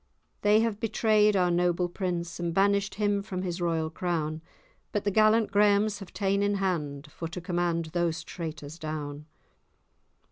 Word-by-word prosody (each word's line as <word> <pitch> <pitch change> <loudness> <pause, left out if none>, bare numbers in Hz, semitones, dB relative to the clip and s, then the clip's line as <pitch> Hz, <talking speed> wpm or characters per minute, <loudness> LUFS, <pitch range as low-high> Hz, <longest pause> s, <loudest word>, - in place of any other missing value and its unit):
They 210 +1 +5
have 225 -2 -1
betray'd 215 -2 +3
our 180 -2 +3
noble 175 0 +2
prince, 175 -2 -3
And 170 -1 -2
banished 200 0 +2
him 205 -1 +1
from 185 -2 -5
his 175 -1 -3
royal 165 -2 0
crown;' 160 -3 -2 0.5
But 205 - -1
the 205 - +1
gallant 215 +1 +4
Grahams 205 0 +3
have 195 - -10
ta'en 200 0 0
in 205 0 +1
hand 150 -7 -2
For 165 - -5
to 165 +3 -6
command 175 -2 -1
those 170 -2 0
traitors 155 -2 -7
down. 150 -1 -5
180 Hz, 155 wpm, -28 LUFS, 165-205 Hz, 0.5 s, They